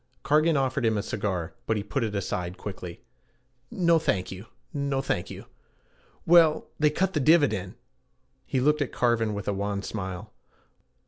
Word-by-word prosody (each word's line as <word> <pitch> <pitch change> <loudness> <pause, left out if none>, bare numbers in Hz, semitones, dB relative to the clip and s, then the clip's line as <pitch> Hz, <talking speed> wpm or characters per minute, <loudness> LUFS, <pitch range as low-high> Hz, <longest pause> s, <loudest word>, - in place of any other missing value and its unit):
Cargan 155 +2 +3
offered 135 0 0
him 110 -2 +2
a 100 - -1
cigar, 95 -6 -3
but 110 - +1
he 100 - -2
put 135 +4 -2
it 105 -2 -2
aside 90 -2 -3
quickly. 90 -4 -7 0.7
'No, 170 -3 +3
thank 100 -12 -1
you; 95 +4 -9 0.3
no, 140 -1 -1
thank 135 -9 -2
you - - -9 0.8
Well 165 -2 +5
they 150 0 +5
cut 185 +5 0
the 155 - +1
dividend.' 130 - +3 0.7
He 130 - 0
looked 150 +3 +2
at 145 - -1
Cargan 115 -3 +1
with 100 - -5
a 105 - +1
wan 100 0 -2
smile. 95 0 -5
115 Hz, 165 wpm, -27 LUFS, 100-150 Hz, 0.8 s, Well